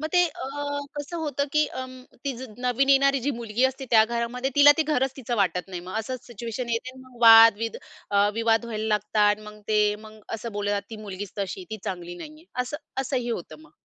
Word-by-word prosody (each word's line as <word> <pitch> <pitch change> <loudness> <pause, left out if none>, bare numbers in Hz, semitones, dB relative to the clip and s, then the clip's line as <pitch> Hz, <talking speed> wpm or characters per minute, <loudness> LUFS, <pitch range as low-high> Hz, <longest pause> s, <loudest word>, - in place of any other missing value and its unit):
मग 310 - -2
ते 360 - +5
अ, 300 - -8 0.5
कसं 290 +4 -5
होतं 290 -4 -1
की 305 0 +4
अं, 255 0 -7 0.2
ती 275 - -1 0.3
नवीन 250 +2 +1
येणारी 275 0 +4
जी - - +3
मुलगी 235 -1 -1
असते 265 +1 0
त्या 220 -2 +7
घरामध्ये, 235 +3 -2
तिला 290 0 +8
ते - - +4
घरच 270 -4 0
तिचं 245 -3 -3
वाटत 180 -3 0
नाही. 180 -2 -5
मग 180 +2 -9
असंच 255 +3 -5
सिच्युएशन 235 +1 -5
येते 250 +3 -3
मग 255 -2 -16
वाद 225 -1 +9
विद 230 0 -3 0.3
अ, 200 0 +4
विवाद 225 0 +2
व्हायला 220 -2 -4
लागतात. 210 0 +2
मग 210 0 -11
ते 215 - +3 0.3
मग 215 0 -14
असं 230 +1 -6
बोललं 205 0 -2
जाते 200 -1 -1
ती 225 - -6
मुलगीच 200 -1 -7
तशी 195 -1 -3
आहे - - -9
ती 220 - -5
चांगली 175 -2 -5
नाही 300 - -9
आहे 310 +2 -17 0.2
असं 255 +4 -5 0.2
असंही 250 -2 -2
होतं 225 - -6
मग. 315 - -18
235 Hz, 215 wpm, -25 LUFS, 210-265 Hz, 0.5 s, वाद